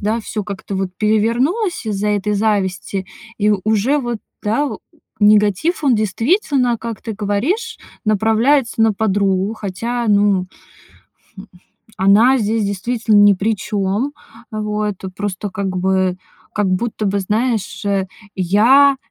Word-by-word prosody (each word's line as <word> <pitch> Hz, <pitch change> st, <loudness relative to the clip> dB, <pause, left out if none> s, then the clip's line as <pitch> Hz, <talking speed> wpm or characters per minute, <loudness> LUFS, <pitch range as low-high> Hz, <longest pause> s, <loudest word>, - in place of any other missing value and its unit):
да, 220 Hz, +2 st, -1 dB
всё 210 Hz, -1 st, -5 dB
как-то 200 Hz, 0 st, -6 dB
вот 190 Hz, -1 st, -2 dB
перевернулось 235 Hz, -, 0 dB
из-за 210 Hz, 0 st, -1 dB
этой 210 Hz, 0 st, 0 dB
зависти, 195 Hz, -2 st, -1 dB, 0.3 s
и 210 Hz, 0 st, +2 dB
уже 220 Hz, +7 st, +2 dB
вот, 240 Hz, -4 st, -3 dB, 0.2 s
да, 225 Hz, +8 st, 0 dB
у -, -, -5 dB, 0.4 s
негатив, 210 Hz, -, +3 dB
он 265 Hz, -4 st, +4 dB
действительно, 245 Hz, -, +1 dB
как 230 Hz, -1 st, -6 dB
ты 225 Hz, -, -5 dB
говоришь, 210 Hz, -, -2 dB, 0.3 s
направляется 225 Hz, +4 st, +2 dB
на 225 Hz, -1 st, +4 dB
подругу, 200 Hz, 0 st, 0 dB
хотя, 230 Hz, +4 st, -3 dB
ну, 200 Hz, -3 st, +3 dB, 0.9 s
хм, 195 Hz, -, -10 dB, 0.5 s
она 215 Hz, +8 st, +5 dB
здесь 220 Hz, 0 st, 0 dB
действительно 215 Hz, +2 st, 0 dB
ни 205 Hz, 0 st, +7 dB
при 205 Hz, +3 st, 0 dB
чём. 205 Hz, +7 st, -2 dB, 0.4 s
А 215 Hz, -1 st, -4 dB
вот, 210 Hz, -1 st, -2 dB
тут 190 Hz, -1 st, -8 dB
просто 205 Hz, 0 st, -4 dB
как 190 Hz, -1 st, -3 dB
бы 185 Hz, 0 st, +1 dB, 0.4 s
как 210 Hz, -2 st, +1 dB
будто 210 Hz, +3 st, -1 dB
бы, 200 Hz, +1 st, 0 dB
знаешь, 220 Hz, +2 st, -1 dB
э, 195 Hz, -1 st, 0 dB, 0.3 s
я, 235 Hz, +10 st, +4 dB
210 Hz, 135 wpm, -18 LUFS, 200-230 Hz, 0.9 s, ни